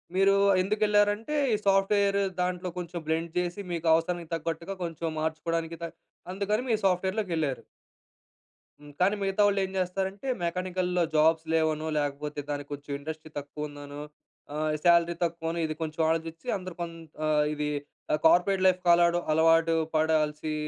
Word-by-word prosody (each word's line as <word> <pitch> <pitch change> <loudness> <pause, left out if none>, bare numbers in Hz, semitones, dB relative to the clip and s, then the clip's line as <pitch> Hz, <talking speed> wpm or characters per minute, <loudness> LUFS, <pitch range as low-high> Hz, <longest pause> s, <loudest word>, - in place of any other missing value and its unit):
మీరు 195 +1 +5 0.3
ఎందుకు 210 +3 -1
ఎళ్లారు 205 0 +4
అంటే, 225 +8 -5 0.2
ఈ - - +4
సాఫ్ట్‌వేర్ 200 +1 +3 0.2
దాంట్లో 180 0 -1
కొంచెం 175 -1 -4
బ్లెండ్ 165 +1 -1
చేసి, 180 +3 -3
మీకు 170 -1 -2
అవసరానికి 165 0 0
తగ్గట్టుగా 165 +3 -4
కొంచెం 165 -1 -4
మార్చుకోవడానికి 165 +1 -2
కా 170 - -1 0.5
అందుకని 205 +4 -1
మీరు 220 -2 +1
సాఫ్ట్‌వేర్‌లోకి 190 +2 0
వెళ్లారు.‌ 150 -5 -2 1.2
హ్మ్. 145 0 -14
కానీ 195 +3 +4
మిగతా 195 +1 +1
వాళ్ళు 200 -1 +1
ఏం 190 - -8
చేస్తారంటే, 190 +5 -2 0.2
మెకానికల్‌లో 180 0 0
జాబ్స్ 160 +1 +4
లేవనో 160 -1 +1
లేకపోతే 145 0 -2
దానికి 145 -1 -4
కొంచెం 145 0 -8
ఇండస్ట్రీ 155 +2 -7
తక్కువ 145 +1 -6
ఉందనో, 145 0 -9 0.5
ఆహ్, 155 0 0
సాలరీ 170 0 +4
తక్కువనో 165 0 -2
ఇది 155 0 -3
కొంచెం 160 +1 -3
ఆలోచించి 165 0 -3
అందరు 185 -2 -8
కో - - 0 0.4
ఆహ్, 150 -1 +3
ఇది 150 0 -2 0.6
కార్పొరేట్ 180 +3 +4
లైఫ్ 185 -1 +4
కాలడం 170 0 +5
అలవాటు 165 +1 +4 0.2
పడాల్సి 155 -1 +1
170 Hz, 145 wpm, -28 LUFS, 155-185 Hz, 1.2 s, మీరు